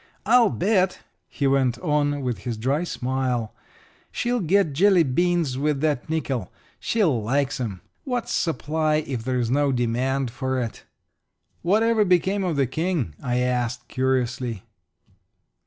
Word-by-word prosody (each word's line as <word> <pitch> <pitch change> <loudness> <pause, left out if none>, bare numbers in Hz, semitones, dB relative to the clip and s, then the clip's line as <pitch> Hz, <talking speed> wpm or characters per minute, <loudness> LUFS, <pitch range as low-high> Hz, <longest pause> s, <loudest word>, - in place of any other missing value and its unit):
I'll 235 0 +5
bet," 190 -1 +1 0.3
he 140 - -3
went 135 -3 +2
on, 145 -3 0
with 125 -3 -2
his 120 -3 -4
dry 135 +8 0
smile, 125 -6 -2 0.6
"she'll 245 0 -1
get 185 -3 +2
jelly 185 +3 +5
beans 160 -1 +1
with 150 -1 0
that 150 -3 0
nickel 135 - -2 0.3
she 225 -2 0
likes 135 - +1
'em. 105 -7 -4 0.2
What's 250 -3 -3
supply 155 0 0
if 135 -6 -2
there's 125 -2 -1
no 145 +1 +2
demand 125 +1 0
for 130 +1 -2
it?" 115 -3 -5 0.8
"What 205 +6 +2
ever 225 -2 +3
became 190 +1 +2
of 175 -4 -1
the 140 -1 +2
King?" 155 - -2
I 125 0 0
asked, 125 -1 -1
curiously. 125 -4 -1
140 Hz, 140 wpm, -24 LUFS, 125-175 Hz, 0.8 s, I'll